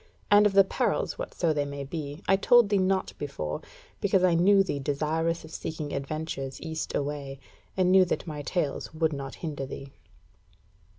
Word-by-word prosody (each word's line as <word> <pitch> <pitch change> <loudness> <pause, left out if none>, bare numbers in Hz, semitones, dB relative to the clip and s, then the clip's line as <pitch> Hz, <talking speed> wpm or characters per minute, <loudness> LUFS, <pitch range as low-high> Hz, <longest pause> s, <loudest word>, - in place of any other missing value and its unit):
And 205 0 +7
of 200 - -2
the 195 0 +7
perils, 190 - -1
whatso 170 - -1
they 145 -1 0
may 140 0 -5
be, 145 +2 -6
I 195 - +5
told 235 +2 +5
thee 200 -1 +3
not 190 0 +1
before, 75 - -4 0.4
because 195 -2 +2
I 180 -2 +5
knew 195 +4 +5
thee 145 -7 -3
desirous 160 +4 -1
of 160 - -13
seeking 155 -2 -5
adventures 140 -1 -4
east 160 -1 -4
away, 140 -1 -3 0.4
and 185 -1 +3
knew 190 0 +7
that 180 - -2
my 150 -3 -5
tales 150 0 -2
would 160 -1 +1
not 140 -1 -6
hinder 145 -4 -4
thee." 135 0 -8
160 Hz, 175 wpm, -28 LUFS, 140-185 Hz, 0.4 s, And